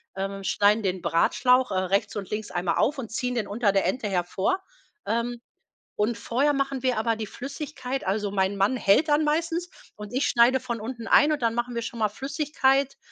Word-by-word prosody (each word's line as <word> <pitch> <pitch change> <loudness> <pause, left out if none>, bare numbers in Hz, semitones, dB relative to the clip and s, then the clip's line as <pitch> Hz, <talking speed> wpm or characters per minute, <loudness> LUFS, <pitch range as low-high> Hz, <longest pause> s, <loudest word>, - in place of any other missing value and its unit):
äh, 195 0 -4
schneiden 205 +3 +2
den 185 -2 -1
Bratschlauch, 250 +9 +2
äh, - - -1
rechts 200 +3 0
und 195 -3 -5
links 210 0 -4
einmal 175 0 -1
auf 285 +6 +2
und 245 -5 -5
ziehen 250 +2 -2
den 225 -4 -1
unter 205 0 +1
der 195 0 +1
Ente 240 -5 -1
hervor, 190 - 0 0.5
ähm, 235 +3 -1 0.6
und 220 +2 0
vorher 275 +7 +1
machen 275 -1 -1
wir 255 -2 0
aber 225 +1 +1
die 220 -1 -5
Flüssigkeit 270 +1 -5
also 200 +1 -1
mein 195 0 0
Mann 195 +6 +2
hält 230 +9 +3
dann 295 +1 +3
meistens 330 +3 -1 0.3
und 210 0 -9
ich 260 +3 0
schneide 245 +2 +4
von 240 -3 -5
unten 235 +1 -6
ein 295 - +5
und 295 -5 -1
dann 230 -1 +2
machen 240 +1 -3
wir 235 - -2
schon 230 +1 -6
mal 215 -1 +2
Flüssigkeit 275 +2 0
235 Hz, 200 wpm, -26 LUFS, 205-265 Hz, 0.6 s, ein